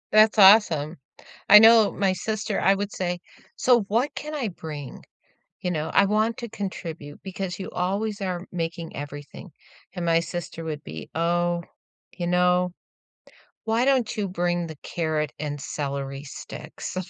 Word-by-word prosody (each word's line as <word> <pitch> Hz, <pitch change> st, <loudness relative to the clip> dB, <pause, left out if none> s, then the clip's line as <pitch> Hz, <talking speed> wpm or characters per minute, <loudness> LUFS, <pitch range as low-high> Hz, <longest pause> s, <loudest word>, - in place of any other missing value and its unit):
That's 215 Hz, +1 st, +6 dB
awesome. 185 Hz, -6 st, +6 dB, 0.5 s
I 210 Hz, -, +11 dB
know 225 Hz, -1 st, +7 dB
my 195 Hz, -2 st, +1 dB
sister 215 Hz, +1 st, -2 dB
I 195 Hz, -, +4 dB
would 200 Hz, +1 st, -3 dB
say, 180 Hz, -3 st, -2 dB, 0.4 s
"So, 245 Hz, -3 st, +4 dB
what 230 Hz, +8 st, 0 dB
can 300 Hz, +1 st, -6 dB
I 255 Hz, -7 st, -1 dB
bring? 155 Hz, -6 st, -8 dB, 0.6 s
You 180 Hz, -, -1 dB
know, 155 Hz, -2 st, -2 dB
I -, -, +6 dB
want 215 Hz, +3 st, +1 dB
to 235 Hz, -2 st, -6 dB
contribute 170 Hz, -8 st, -6 dB
because 190 Hz, -1 st, -5 dB
you 190 Hz, -, -5 dB
always 200 Hz, +4 st, -1 dB
are 180 Hz, -2 st, -3 dB
making 165 Hz, -1 st, -4 dB
everything." 145 Hz, 0 st, -8 dB, 0.4 s
And 175 Hz, -, -4 dB
my 165 Hz, 0 st, +4 dB
sister 165 Hz, 0 st, -6 dB
would 150 Hz, -2 st, -5 dB
be, 80 Hz, -1 st, -8 dB
"Oh, 175 Hz, +1 st, +1 dB, 0.5 s
you 175 Hz, -2 st, -2 dB
know, 180 Hz, 0 st, +2 dB, 0.9 s
why 225 Hz, +2 st, +1 dB
don't 260 Hz, -4 st, +2 dB
you 205 Hz, -2 st, -1 dB
bring 175 Hz, -1 st, -1 dB
the 160 Hz, -1 st, -8 dB
carrot 155 Hz, -3 st, -2 dB
and 145 Hz, -1 st, -4 dB
celery 140 Hz, -1 st, -4 dB
sticks?" 145 Hz, -, -8 dB
180 Hz, 150 wpm, -25 LUFS, 160-210 Hz, 0.9 s, I